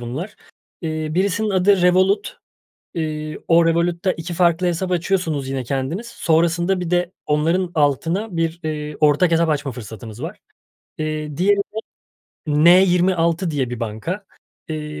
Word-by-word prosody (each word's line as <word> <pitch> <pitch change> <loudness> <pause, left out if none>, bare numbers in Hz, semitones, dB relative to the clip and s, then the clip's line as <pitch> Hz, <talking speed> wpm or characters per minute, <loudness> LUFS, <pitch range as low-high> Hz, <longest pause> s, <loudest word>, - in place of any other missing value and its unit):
bunlar. 135 - -6 0.5
Eee, 155 -1 -2
birisinin 200 +5 0
adı 190 0 +3
Revolut. 185 - +3 0.6
Iıı, 155 -2 -3
o 170 0 +5
Revolut'ta 170 +2 +1
2 170 +1 -6
farklı 175 +1 +2
hesap 175 +2 -1
açıyorsunuz 170 -6 0
yine 135 -1 -2
kendiniz. 135 - -3
Sonrasında 170 -1 +1
bir 175 -2 -3
de 175 0 +1
onların 165 +4 +1
altına 165 +7 0
bir, 165 0 -1
ııı, 150 -1 -4
ortak 150 +3 +4
hesap 165 0 +3
açma 145 -2 -1
fırsatımız 110 +1 -9
var. 175 +6 -6 0.6
Eee, 155 -1 -3
diğeri 200 +3 +3
de 200 +2 -4 0.7
N26 175 +2 +4
diye 135 -5 -1
bir 125 - -5
banka. 120 - -4 0.4
Eee, 150 -1 -5
165 Hz, 135 wpm, -21 LUFS, 150-180 Hz, 0.7 s, o